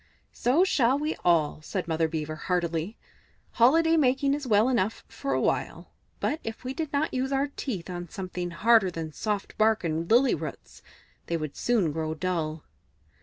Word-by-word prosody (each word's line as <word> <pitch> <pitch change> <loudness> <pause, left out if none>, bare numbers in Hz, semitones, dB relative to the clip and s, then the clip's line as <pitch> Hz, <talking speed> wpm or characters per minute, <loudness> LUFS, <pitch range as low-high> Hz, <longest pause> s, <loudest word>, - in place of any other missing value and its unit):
"So 270 +9 +3
shall 265 -8 +3
we 300 +2 -2
all," 160 -3 +2
said 180 +3 -4
Mother 160 0 +1
Beaver 155 -1 -4
heartily. 170 +3 -2 0.5
"Holiday 325 +7 +4
making 275 -1 +2
is 285 -2 -3
well 215 0 +4
enough 230 -5 0
for 275 - -4
a - - +1
while, - - -2 0.3
but 310 - -1
if 225 +2 -6
we 255 +1 -4
did 310 0 -4
not 295 +2 0
use 260 +1 -1
our 275 +1 +1
teeth 225 -11 -5
on 175 -2 -6
something 180 -1 -5
harder 215 +3 +4
than 165 -2 -5
soft 210 +2 -3
bark 220 -1 +3
and 165 0 -2
lily 250 +4 +5
roots, - - -7 0.5
they 170 - 0
would 155 -3 -5
soon 215 -10 +1
grow 160 +1 -3
dull." 160 -3 -2
205 Hz, 170 wpm, -27 LUFS, 165-260 Hz, 0.5 s, lily